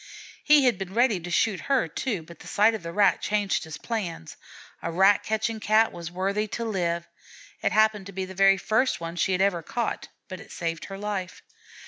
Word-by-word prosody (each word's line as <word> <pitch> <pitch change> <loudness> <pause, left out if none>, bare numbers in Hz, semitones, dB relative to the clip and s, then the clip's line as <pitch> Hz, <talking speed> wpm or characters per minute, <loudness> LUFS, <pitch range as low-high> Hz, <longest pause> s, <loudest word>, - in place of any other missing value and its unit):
He 295 -2 +6
had 240 -7 +2
been 195 +1 -6
ready 235 -5 +3
to 175 +1 -8
shoot 190 +3 +1
her, 265 -10 +3
too, 195 - -3
but 170 0 -14
the - - -12
sight 215 +3 +3
of 220 - -4
that 170 0 -6
Rat 200 +3 +3
changed 205 -4 0
his 160 -2 -7
plans: 180 - -5 0.5
a - - -3
rat 195 +4 +4
catching 220 +1 -2
Cat 215 +2 +3
was 170 -1 -7
worthy 195 +4 -1
to 230 - -3
live. 170 -5 -1 0.5
It - - +1
happened 215 -2 +2
to - - -8
be 190 0 -4
the 190 - -9
very 195 +1 +5
first 220 +6 +1
one 165 0 -6
she 185 +2 +1
had 185 - +1
ever 195 -3 +2
caught, 235 +8 -3 0.2
but 185 -2 -7
it - - -13
saved 165 -2 -4
her 195 - -7
life. 200 -3 -4
195 Hz, 210 wpm, -26 LUFS, 175-220 Hz, 0.5 s, He